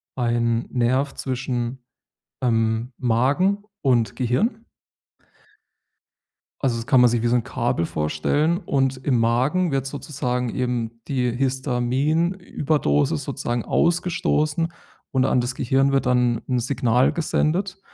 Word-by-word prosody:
ein 115 -1 0
Nerv 130 +3 +1
zwischen, 125 -1 -3 0.6
ähm, 115 0 0
Magen 140 - +1 0.2
und 120 -6 +2
Gehirn 215 - 0 2.0
Also, 125 -4 +1
das 115 - -5
kann 130 - +5
man 125 - +7
sich 120 -1 0
wie 120 - +1
so 120 - +3
'n 120 - 0
Kabel 85 - -1
vorstellen. 115 - 0
Und 135 -7 0
im 130 -2 0
Magen 130 +10 +2
wird 135 -1 -1
sozusagen 130 -3 -3
eben 120 -2 -3
die 125 -3 0
Histamin-Überdosis 135 - 0
sozusagen 120 -1 -3
ausgestoßen 170 -2 +1 0.4
und 130 -1 +2
an 125 -1 +2
das 125 +1 -3
Gehirn 135 +2 +1
wird 135 -2 +1
dann 125 -2 +2
'n 125 - +1
Signal 125 0 +2
gesendet. 180 +4 -1
130 Hz, 120 wpm, -23 LUFS, 120-145 Hz, 2.0 s, man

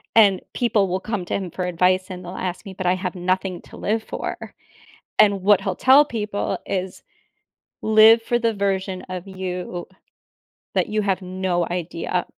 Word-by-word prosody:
and 205 -4 +6
people 220 -5 +2
will 185 +1 -1
come 205 -3 -4
to - - -5
him 190 -3 -4
for 180 +2 -3
advice, 185 +2 +1
and 180 -1 -7
they'll 180 +2 -7
ask 185 +3 -4
me, 195 - -8
"But 185 -1 -6
I 180 - +3
have 185 0 -4
nothing 185 0 -1
to - - -13
live 220 +2 -1
for," - - -6 0.7
and 200 -2 +5
what 195 0 +4
he'll 190 -2 -2
tell 270 +7 +6
people 210 -6 -3
is, 190 -1 -3 0.8
"Live 220 +1 +7
for 240 - +1
the 230 -1 +1
version 195 -2 -1
of 185 +1 -6
you 180 -2 -5 0.9
that - - +1
you 215 0 0
have 195 -1 0
no 185 -1 -1
idea 175 0 -2
190 Hz, 175 wpm, -22 LUFS, 180-210 Hz, 0.9 s, Live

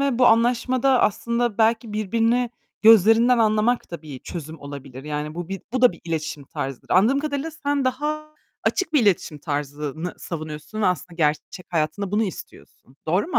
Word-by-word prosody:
ve 275 -4 +1
bu 250 - +6
anlaşmada 245 +3 +3
aslında 235 +1 0
belki 225 0 +2
birbirini 230 +3 +1 0.3
gözlerinden 225 +3 +6
anlamak 220 +1 +2
da 170 -2 -7
bir 145 -4 -8
çözüm 160 +2 -8
olabilir. 140 -1 -9
Yani 150 +1 -4
bu 175 -1 -5
bir 195 -1 -5
bu 255 - -1
da 250 - +7
bir 170 - -15
iletişim 155 -3 -3
tarzıdır. 135 -1 -6
Anladığım 225 +10 +4
kadarıyla 300 +1 -3
sen 285 -3 -1
daha 300 +4 -2 0.4
açık 375 -6 0
bir 295 -6 +4
iletişim 180 -6 +1
tarzını 145 +2 -4
savunuyorsun 155 +5 -6
ve - - +4
aslında 180 -1 -1
gerçek 155 +3 -1
hayatında 170 +4 -1
bunu 210 +2 +2
istiyorsun. 175 - -9
Doğru 180 - +1
mu 355 - +1
210 Hz, 165 wpm, -23 LUFS, 155-245 Hz, 0.4 s, da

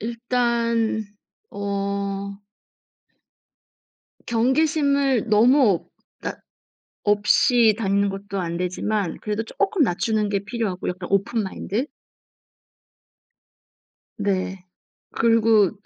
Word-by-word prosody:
일단 235 -1 0 0.5
어 200 0 -3 2.0
경계심을 275 0 +2
너무 235 +7 +5
없 175 - -2 0.3
낮 - - -4 0.7
없이 215 +2 +4
다니는 200 -2 +1
것도 195 0 -5
안 170 -1 -3
되지만 185 +1 -2
그래도 210 +1 -2
쪼끔 390 - 0
낮추는 215 0 0
게 200 -1 0
필요하고 215 -4 -3
약간 180 0 -5
오픈 200 +4 +1
마인드. 205 +5 -3 2.3
네. 190 -2 -2 0.5
그리고 225 -3 +4
215 Hz, 175 characters per minute, -23 LUFS, 200-235 Hz, 2.3 s, 너무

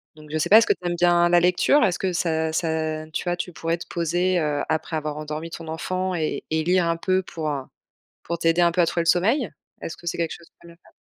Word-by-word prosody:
Donc, 155 -1 -14
je 155 - -1
sais 155 - -1
pas, 215 - +9
est-ce 230 - +5
que - - +4
tu 180 - -13
aimes 175 - -1
bien, 175 0 +4
la 175 0 +5
lecture? 180 +11 +3
Est-ce 180 -2 0
que 190 - -1
ça 160 -2 0
ça, 160 -1 -2
tu - - -3
vois, 175 0 -1
tu 180 0 -5
pourrais 165 +1 -2
te 175 - -10
poser, 175 +2 0
heu, 150 -2 0
après 160 0 -1
avoir 150 -1 -4
endormi 155 +2 -5
ton 165 -1 -8
enfant 185 +3 -2
et-et 160 -1 -2
lire 180 +1 +2
un 165 - 0
peu, 185 +2 0
pour, 160 -3 -4
heu, 140 -2 -3 0.6
pour 170 - -4
t'aider 165 +2 +2
un 170 - +4
peu 175 - +1
à 170 - +4
trouver 170 - 0
le - - -7
sommeil? 220 - +1 0.3
Est-ce 165 - -5
que 170 - -16
c'est - - -1
quelque 165 -1 -1
chose 170 - -11
que - - -55
tu 170 - -14
aimes 170 - -14
bien - - -26
faire? - - -23
170 Hz, 275 wpm, -23 LUFS, 160-175 Hz, 0.6 s, pas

